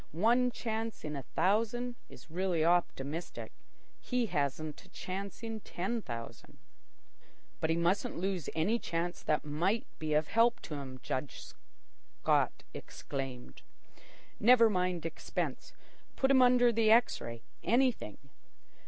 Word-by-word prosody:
One 240 +6 +4
chance 225 -2 -4
in 150 -1 -4
a 140 - -3
thousand 230 - 0
is - - -14
really 175 -2 +1
optimistic. 165 -2 -1 0.5
He 250 -1 0
hasn't 150 -3 -2
a 190 - -19
chance 195 +4 -6
in 225 -1 -4
ten 215 +4 -3
thousand." 115 - -8 1.0
"But 160 - 0
he 165 - +3
mustn't 170 +4 +1
lose 185 -3 -2
any 205 +9 +2
chance 175 -2 -3
that 150 -1 0
might 175 +10 0
be 155 -1 0
of 155 +1 +2
help 230 +1 +4
to - - -7
him," 135 -3 -6
Judge 130 +3 -3 0.8
Scott - - +2
exclaimed. 130 - -6 0.8
"Never 230 0 +6
mind 180 -3 0
expense. 165 - -3 0.4
Put 265 0 +2
him 260 -1 +6
under 245 -1 +6
the 225 -1 +3
X 230 +2 +5
ray—anything. 115 - -1
180 Hz, 125 wpm, -32 LUFS, 155-230 Hz, 1.0 s, Never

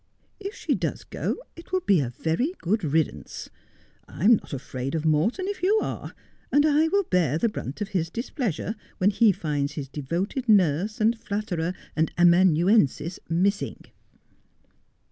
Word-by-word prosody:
If 405 +2 -6
she - - -1
does - - -2
go - - -3 0.2
it 335 - -13
will 370 0 +1
be 195 - +3
a 130 -4 -1
very 165 - -1
good 205 +4 0
riddance. 155 0 -2 0.6
I 175 - -4
am 230 +1 +7
not - - -13
afraid 135 0 -4
of 160 -1 -2
Morton, 165 - +1
if 405 -2 -4
you 410 +4 +3
are, - - -5 0.4
and 290 +1 +4
1 310 +1 +3
will 400 0 +3
bear 170 - +1
the 230 - +2
brunt 180 - -6
of 205 - -2
his 170 -5 -1
displeasure 225 - -3 0.2
when 200 +1 +3
lie 225 -3 +8
finds 145 -5 -2
his 145 -3 -5
devoted 175 - -3
nurse, 195 +1 +3
and 225 +1 +2
flatterer, 185 -5 -3 0.2
and 160 +1 +1
amanuensis 175 - +4
missing.' 195 +5 0
185 Hz, 160 wpm, -25 LUFS, 160-230 Hz, 0.6 s, lie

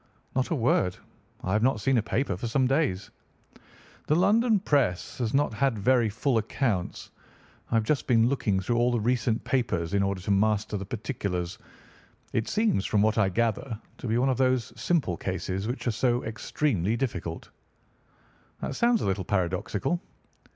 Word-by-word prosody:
"Not 130 -1 +1
a 165 - +1
word. 115 -8 +1 0.5
I 95 - -1
have 105 - +2
not 125 -1 +2
seen 135 +5 +2
a - - +1
paper 110 -2 -1
for 110 +6 -4
some 130 +3 +2
days." 130 - 0 1.0
"The 150 - +3
London 215 +5 +4
press 135 - 0
has 115 -3 0
not 140 -4 +1
had 125 +1 +1
very 120 +2 +3
full 115 +3 +1
accounts. 110 -4 -2 0.6
I - - 0
have 115 - +3
just 140 +5 0
been 115 -3 +4
looking 110 -7 +1
through 115 +5 -1
all 120 +1 +3
the 120 - +1
recent 120 0 0
papers 95 -11 -1
in 100 - +3
order 100 -1 0
to 100 - -2
master 105 +1 +1
the 100 -1 -4
particulars. 100 -6 -3 0.7
It 115 - 0
seems, 215 - +1
from 105 0 +2
what 110 +1 +2
I 100 -3 +3
gather, 115 +3 -1 0.2
to - - -5
be 115 +1 +1
one 130 +2 +2
of 130 - +1
those 130 -3 +1
simple 120 - 0
cases 95 +2 -3
which 125 +3 -4
are 120 - +2
so 120 +2 +1
extremely 110 - -1
difficult." 95 -10 -4 1.1
"That - - -3
sounds 235 - +2
a - - -1
little 95 0 0
paradoxical." 95 - -1
115 Hz, 175 wpm, -27 LUFS, 100-130 Hz, 1.1 s, London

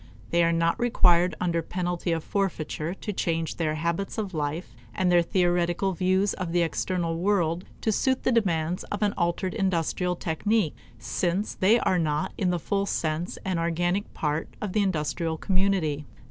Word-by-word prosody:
They 170 0 +4
are 170 - +3
not 165 +2 +1
required 180 -7 +4
under 170 -2 +1
penalty 175 +1 -2
of 165 -1 -1
forfeiture 175 -3 -2
to 210 - -5
change 165 -3 -1
their 155 -2 0
habits 170 +5 -2
of 205 -4 -3
life 150 -3 -3 0.2
and 185 -1 +2
their 175 -1 +6
theoretical 175 +1 +1
views 185 +3 +2
of 180 -3 -4
the 175 -1 +3
external 165 0 -1
world 180 -2 +1 0.2
to 220 - +1
suit 260 +5 +1
the - - +2
demands 180 -7 +1
of 205 +1 -3
an 205 -1 +2
altered 175 +1 0
industrial 180 -3 0
technique, 175 +2 0 0.2
since 185 +4 -1
they 205 +5 +4
are 180 - +2
not 150 -2 0
in 185 - 0
the 175 - +1
full 200 +4 -1
sense 160 +1 -2
an 185 -3 0
organic 175 +4 0
part 150 +1 -1
of 205 -3 -4
the 215 - +3
industrial 165 -3 -1
community. 185 -6 0
175 Hz, 170 wpm, -26 LUFS, 165-195 Hz, 0.2 s, their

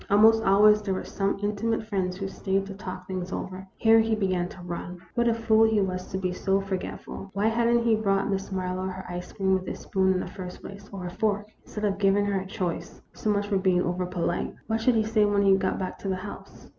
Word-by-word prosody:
Almost 220 +2 +6
always 210 +2 +6
there 195 -2 -1
were - - -3
some 195 0 -1
intimate 215 +2 0
friends 190 -4 -2
who 195 0 -3
stayed 195 0 -1
to 195 - -7
talk 185 -2 -7
things 185 -1 -4
over. 190 0 -5
Here 225 0 +6
he 225 0 +2
began 185 -4 0
to 190 - -12
run. 175 +1 -6
What 235 -1 +2
a 230 - +4
fool 225 -1 +4
he 220 -1 +3
was 185 -2 -2
to 190 - -4
be 185 -1 -1
so 195 +1 +1
forgetful! 195 0 -5
Why 205 +2 +2
had 230 +1 +1
n't 235 0 +3
he 230 -1 +4
brought 195 -2 +1
Miss 195 0 -2
Mar 185 -1 -2
lowe 185 +1 -2
her 185 0 -7
ice 180 0 -6
cream 190 -1 +1
with 185 -1 0
a - - -3
spoon 190 -1 +1
in 185 - +1
the - - -3
first 180 -2 -8
place, 200 +1 -10
or 190 -2 -6
a 175 - -4
fork, 210 0 -1
instead 210 0 -4
of 200 -1 0
giving 200 0 +3
her 200 -1 0
a 190 - -8
choice? 185 -4 -4
So 215 - -3
much 205 -1 +1
for 200 -2 +1
being 185 -1 +3
over 180 +1 -1
polite. 175 -1 -2
What 225 0 -1
should 245 +1 +3
he 220 - +3
say 220 0 +2
when 205 -1 +3
he 195 -1 +6
got 190 -1 0
back 185 - -4
to - - -6
the 190 - +1
house 185 +2 -9
195 Hz, 255 wpm, -27 LUFS, 185-210 Hz, -, Almost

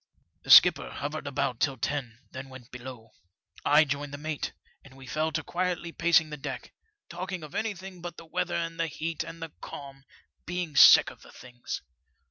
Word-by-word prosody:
The - - -13
skipper - - +8
hovered 150 +1 -5
about 135 -3 -1
till 140 -3 0
ten, 125 -2 -3
then 135 +1 -8
went 130 -2 -13
below. 125 -3 -10 0.5
I 150 +2 +5
joined 140 0 -3
the - - -7
mate, 150 0 -4 0.3
and 135 -1 -16
we 135 - -12
fell 155 +4 -1
to 160 - -1
quietly 175 0 -2
pacing 165 -2 +3
the 150 - -5
deck, 135 - -7 0.3
talking 185 -2 -5
of 150 - -10
anything 190 -4 -4
but 175 -1 -7
the 165 - -11
weather 180 +2 -2
and 165 0 -3
the 165 - +1
heat, 160 +1 -4
and 165 0 -9
the 165 - -7
calm, 135 -1 -9 0.4
being 175 -4 -3
sick - - +8
of - - -17
the - - -15
things. 125 -1 -8
155 Hz, 185 wpm, -28 LUFS, 135-170 Hz, 0.5 s, skipper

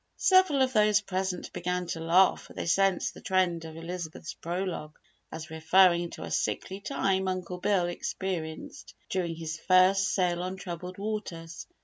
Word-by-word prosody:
Several 370 -8 +4
of 260 0 0
those 210 -2 +4
present 190 -2 -3
began 180 +1 -2
to 170 -1 -4
laugh 175 +4 +4
for - - -14
they - - -4
sensed 195 +1 +2
the - - -12
trend 180 -3 +1
of 160 0 -9
Elizabeth's 165 -2 -6
prologue 170 -3 -4 0.3
as 160 0 -7
referring 170 +2 +4
to - - -8
a - - -7
sickly 190 +1 -2
time 195 -5 0
Uncle 180 -1 -3
Bill 185 -1 +2
experienced 175 -2 -5 0.2
during 175 -3 -1
his 160 -1 -5
first 190 +2 +4
sail 180 -2 +1
on 185 +1 -3
troubled 180 -1 -7
waters. 195 -6 -5
180 Hz, 155 wpm, -28 LUFS, 170-190 Hz, 0.3 s, Several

